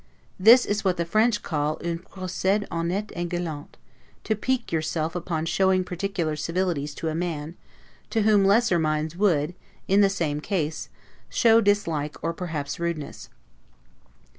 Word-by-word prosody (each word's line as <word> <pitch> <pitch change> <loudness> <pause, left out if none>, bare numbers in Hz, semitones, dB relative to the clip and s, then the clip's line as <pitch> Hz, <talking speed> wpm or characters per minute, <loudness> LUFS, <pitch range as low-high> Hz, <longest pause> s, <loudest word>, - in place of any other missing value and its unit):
This 235 +6 +7
is 205 +1 -1
what 185 -2 +1
the 170 - -1
French 215 +5 +2
call 150 -1 -1
un 170 -1 -2
'procede 190 +2 -2
honnete 175 +5 -2
et 175 0 -3
galant', 165 -4 -5 0.5
to 220 - 0
PIQUE 250 +3 -2
yourself 160 0 -1
upon 165 -2 -2
showing 190 +2 +2
particular 180 -3 -2
civilities 165 -2 -2
to 165 - -3
a - - -3
man, 165 -1 -3 0.5
to 220 -2 +1
whom 210 -2 +4
lesser 200 -2 +4
minds 155 0 -1
would, 175 -5 +1 0.3
in 195 +2 +4
the 200 - +5
same 155 -6 -2
case, 160 -4 -2 0.4
show 230 -1 +5
dislike, 165 -8 0
or 165 +1 -1
perhaps 160 -5 -4
rudeness. 170 -4 -4
175 Hz, 145 wpm, -25 LUFS, 155-200 Hz, 0.5 s, This